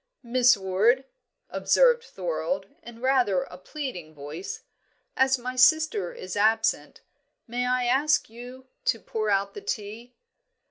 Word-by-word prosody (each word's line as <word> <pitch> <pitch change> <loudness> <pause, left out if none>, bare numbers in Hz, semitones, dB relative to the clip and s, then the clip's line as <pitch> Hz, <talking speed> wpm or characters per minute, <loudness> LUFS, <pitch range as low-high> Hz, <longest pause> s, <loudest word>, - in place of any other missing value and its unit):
"Miss 250 0 +4
Ward," 200 +7 +2 0.5
observed 485 -1 +3
Thorold, - - -3 0.2
in 235 -1 -12
rather 250 -8 +2
a - - -11
pleading 185 - -7
voice, 150 +6 -7 0.5
"as 265 0 +3
my 255 +1 -5
sister 255 - +3
is 185 0 -7
absent, 220 +2 +1 0.5
may 245 +1 -2
I 250 0 +1
ask 290 +4 +2
you 245 +3 -11 0.2
to 230 - +1
pour 215 -1 -3
out 200 0 +1
the 415 - -8
tea." 235 - -6
240 Hz, 130 wpm, -26 LUFS, 205-265 Hz, 0.5 s, Miss